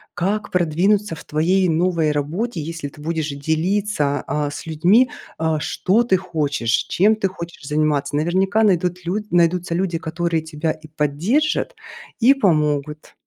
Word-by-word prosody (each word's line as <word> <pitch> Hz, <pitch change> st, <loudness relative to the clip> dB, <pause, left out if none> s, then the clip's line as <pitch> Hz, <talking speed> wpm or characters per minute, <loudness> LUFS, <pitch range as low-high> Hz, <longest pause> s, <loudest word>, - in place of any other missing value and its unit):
как 200 Hz, +4 st, -1 dB
продвинуться 180 Hz, +3 st, +1 dB
в -, -, -11 dB
твоей 180 Hz, +5 st, +1 dB
новой 165 Hz, -1 st, +1 dB
работе. 165 Hz, +9 st, -2 dB
Если 160 Hz, -1 st, -5 dB
ты 145 Hz, -, -14 dB
будешь 160 Hz, 0 st, -2 dB
делиться, 160 Hz, +1 st, -1 dB
а, 145 Hz, +1 st, -1 dB
с 145 Hz, -, -8 dB
людьми, 180 Hz, +11 st, +3 dB, 0.3 s
а, 160 Hz, -1 st, 0 dB
что 190 Hz, +7 st, +1 dB
ты 210 Hz, -6 st, +2 dB
хочешь, 150 Hz, -9 st, -2 dB, 0.2 s
чем 210 Hz, +4 st, +3 dB
ты 215 Hz, -2 st, 0 dB
хочешь 170 Hz, -4 st, -9 dB
заниматься. 150 Hz, -1 st, 0 dB
Наверняка 190 Hz, +7 st, +1 dB
найдут 180 Hz, -3 st, +1 dB
лю 180 Hz, +4 st, -1 dB
найдутся 175 Hz, 0 st, +2 dB
люди, 175 Hz, -2 st, -1 dB
которые 165 Hz, 0 st, -1 dB
тебя 160 Hz, 0 st, -2 dB
и 155 Hz, 0 st, -10 dB
поддержат, 170 Hz, -, 0 dB, 0.4 s
и 250 Hz, +3 st, +6 dB
помогут. 150 Hz, -, 0 dB
170 Hz, 145 wpm, -21 LUFS, 150-190 Hz, 0.4 s, и